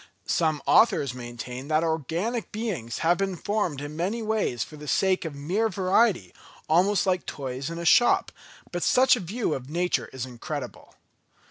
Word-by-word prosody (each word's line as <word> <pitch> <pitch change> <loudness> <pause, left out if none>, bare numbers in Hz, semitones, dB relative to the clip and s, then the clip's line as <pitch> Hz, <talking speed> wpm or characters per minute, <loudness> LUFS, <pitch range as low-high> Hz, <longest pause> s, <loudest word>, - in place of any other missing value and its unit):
Some 155 -3 0
authors 185 - +4
maintain 125 +1 -7
that 155 +1 +2
organic 165 - -2
beings 195 - -4
have 175 +2 +3
been 195 -1 -1
formed 180 -6 -2
in 145 +1 -6
many 200 +8 -2
ways 215 - 0
for 155 - -11
the 150 0 -10
sake 190 +3 +1
of 155 -3 -5
mere 185 +11 0
variety, 190 - +2 0.3
almost 185 +6 +3
like 185 -2 +1
toys 135 0 -4
in 170 - -6
a 170 - -5
shop, 240 +8 +4 0.4
but 175 - -3
such 255 +7 +5
a - - -4
view 200 0 -2
of 130 -1 -6
nature 175 +3 0
is 130 -1 -5
incredible. 125 -2 -7
170 Hz, 165 wpm, -26 LUFS, 140-205 Hz, 0.4 s, such